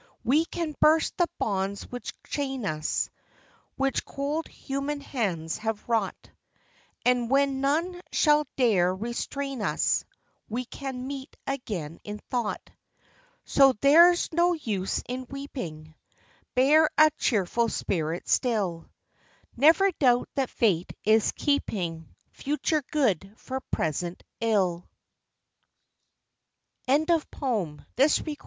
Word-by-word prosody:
We 285 +7 +3
can 330 -2 -4
burst 315 +1 +4
the 350 - +3
bonds 195 -1 -1
which 245 0 -5
chain 270 -5 -3
us, 155 -4 -1 0.7
Which 270 0 0
cold 290 +3 -3
human 275 +2 -4
hands 190 - -2
have 220 -1 -3
wrought, 225 -5 -1 0.7
And 245 -1 +2
when 275 0 +2
none 335 +6 0
shall 300 -1 +3
dare 190 -8 +3
restrain 250 +5 -4
u's 210 - +1 0.5
We 245 +3 -3
can 260 0 -6
meet 275 +1 -7
again, 200 - -4
in 210 0 -6
thought. 240 -4 -2 0.8
So 270 -1 +5
there's 335 +10 +5
no 345 +2 +3
use 210 - -2
in 255 +1 -5
weeping, 175 - -7 0.6
Bear 300 +5 +5
a 310 0 +7
cheerful 230 +2 +1
spirit 165 -4 -2
still; 200 -10 0 0.7
Never 325 +9 +5
doubt 245 -3 +3
that 270 -2 0
Fate 185 -7 +1
is 220 0 +4
keeping 175 - -1 0.2
Future 300 +2 -1
good 205 - +1
for 265 0 -5
present 170 +3 -2 0.2
ill. 190 -6 0 2.0
Charlotte 315 +4 +2
Bro? 205 - -2
250 Hz, 105 wpm, -27 LUFS, 200-285 Hz, 2.0 s, a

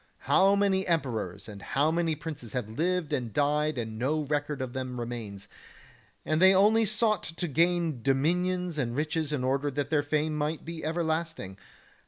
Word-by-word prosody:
How 195 +1 +5
many 195 -1 +2
emperors 120 - -1
and 100 -2 -9
how 145 +8 +1
many 165 -1 0
princes 150 -7 -7
have 125 -4 -2
lived 170 +8 -1
and 120 -3 -2
died 150 +3 +1
and 110 -2 -4
no 150 +6 +1
record 145 0 -2
of 130 -2 -4
them 130 -1 -4
remains, 110 -4 -6 0.8
and 155 +2 +1
they 190 +1 +7
only 215 +3 +4
sought 215 -1 +1
to 165 +2 -4
gain 165 -2 +1
dominions 175 +6 +1
and 120 -3 -1
riches 155 +1 -1
in 140 -4 -1
order 135 +3 +1
that 145 +1 -3
their 150 -2 +3
fame 150 +1 0
might 150 +1 -2
be 165 -1 -6
ever 165 +2 -1
lasting. 160 - -2
150 Hz, 175 wpm, -28 LUFS, 130-170 Hz, 0.8 s, they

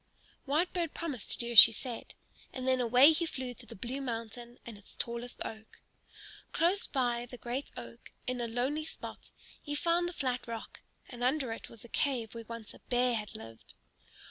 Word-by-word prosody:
Whitebird 335 +3 +1
promised 290 -10 -4
to - - -2
do 235 0 -3
as 230 - +12
she 230 - +12
said. 240 +1 -6 0.4
And 255 0 -4
then 260 -1 +4
away 250 +5 +8
he 335 +1 +1
flew 260 -5 -4
to 240 0 -11
the - - -9
blue 250 +7 -4
mountain 235 -1 -5
and 235 - -7
its 205 0 -14
tallest 235 +1 -4
oak. 220 0 -8 0.7
Close 355 +5 +3
by 245 -3 0
the 250 - -9
great 245 +4 -4
oak, 115 0 -9 0.2
in 250 -1 -1
a 235 - -1
lonely 255 +7 0
spot, 315 - -9 0.3
he 290 -1 -4
found 340 +3 +2
the - - -7
flat 255 -5 -2
rock, 230 -1 -6 0.3
and 245 -2 -7
under 260 -1 +2
it - - -8
was 230 - -10
the - - -10
cave 240 -3 0
where 230 -1 -7
once 230 -2 -7
a - - -14
bear 245 0 +3
had 210 -3 -3
lived. 115 0 -11
245 Hz, 195 wpm, -32 LUFS, 230-275 Hz, 0.7 s, as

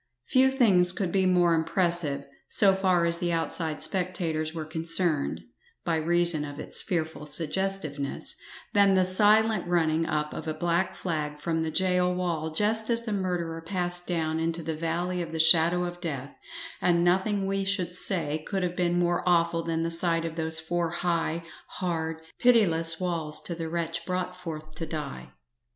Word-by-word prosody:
Few 265 0 +4
things 195 -10 +4
could 185 -2 -2
be 190 0 +2
more 175 -2 +3
impressive, 165 -4 0 0.2
so 195 -2 +5
far 185 -3 +2
as 170 0 0
the 175 -1 -1
outside 165 -2 0
spectators 165 -2 -2
were 160 -1 -6
concerned 160 - +1 0.4
(by 165 -1 +1
reason 170 -1 +3
of 145 0 -7
its - - -1
fearful 160 -5 -3
suggestiveness) 155 -2 -2 0.4
than 200 -1 +5
the 185 -1 +3
silent 210 +1 +4
running 165 -2 +1
up 150 -1 -2
of - - -7
a 155 - -2
black 175 +3 0
flag 150 -4 -3
from 160 +2 -2
the 160 - -1
gaol 180 +1 +1
wall 170 -3 -2
just 215 +7 0
as 235 0 +1
the 215 - -2
murderer 175 -4 -3
passed 175 0 0
down 160 -2 -1
into 165 +1 -2
the 160 +1 -3
valley 170 +3 -2
of 165 -1 -6
the 160 - -4
shadow 165 +2 +6
of 175 0 -6
death; 140 -5 -5 0.5
and 170 -1 +2
nothing 190 +3 +1
we 195 0 -1
should 190 -3 -1
say 160 -5 0
could 195 -2 -2
have 180 -1 -2
been 175 -1 0
more 175 0 +1
awful 170 -1 +2
than 165 0 -2
the 165 - -1
sight 165 0 0
of 165 -1 -5
those 160 -1 -3
four 170 +1 -2
high, 170 -1 -1 0.3
hard, 160 -3 -3 0.2
pitiless 165 -9 +3
walls 165 -4 -2
to 175 - -6
the 165 -1 -5
wretch 165 0 -3
brought 180 0 -3
forth 155 -3 -8
to 165 - -5
die. 150 -3 -6
170 Hz, 170 wpm, -27 LUFS, 160-180 Hz, 0.5 s, shadow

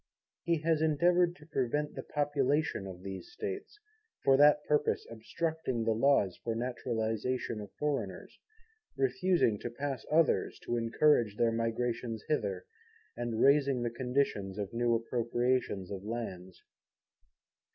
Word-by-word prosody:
He 170 -2 0
has 160 -1 +2
endeavoured 175 +3 +3
to 150 - -16
prevent 145 0 -1
the - - -5
population 145 -6 0
of 90 -1 -9
these 95 - -7
States; 415 +1 -6 0.4
for 135 - +5
that 150 +1 +6
purpose 150 0 +1
obstructing 130 +2 -2
the 115 - +1
Laws 115 -5 +2
of 115 -1 -2
Naturalization 115 -1 -2
of 100 -2 -9
Foreigners; 150 -2 -3 0.6
refusing 135 - +2
to 120 - -4
pass 135 +1 -4
others 160 +1 +2
to 120 - -2
encourage 115 -2 +2
their 115 -1 +3
migration 115 0 -1
hither, 100 -11 -1 0.5
and 120 -2 -2
raising 140 -3 +4
the 120 - -1
conditions 125 -6 -1
of 100 0 -4
new 120 0 +2
Appropriations 120 -3 -1
of 95 -1 -5
Lands. 95 -5 -6
125 Hz, 130 wpm, -31 LUFS, 115-150 Hz, 0.6 s, that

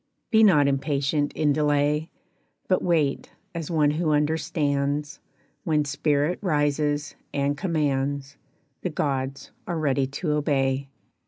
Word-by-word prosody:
Be 220 -1 +5
not 150 -9 +6
impatient 140 +1 0
in 150 -2 +2
delay, 150 +1 +1 0.6
But 185 - +2
wait 160 -6 +1 0.2
as 165 -3 -5
one 150 -3 +3
who 160 +1 0
understands; 150 -1 0 0.4
When 150 -3 +1
spirit 145 +3 0
rises 145 -3 0 0.2
and 140 0 +1
commands, 145 -4 -1 0.5
The 180 - -2
gods 135 -3 -2 0.2
are 175 - -2
ready 140 -3 +1
to 145 +4 -3
obey. 140 -2 0
145 Hz, 115 wpm, -25 LUFS, 140-155 Hz, 0.6 s, not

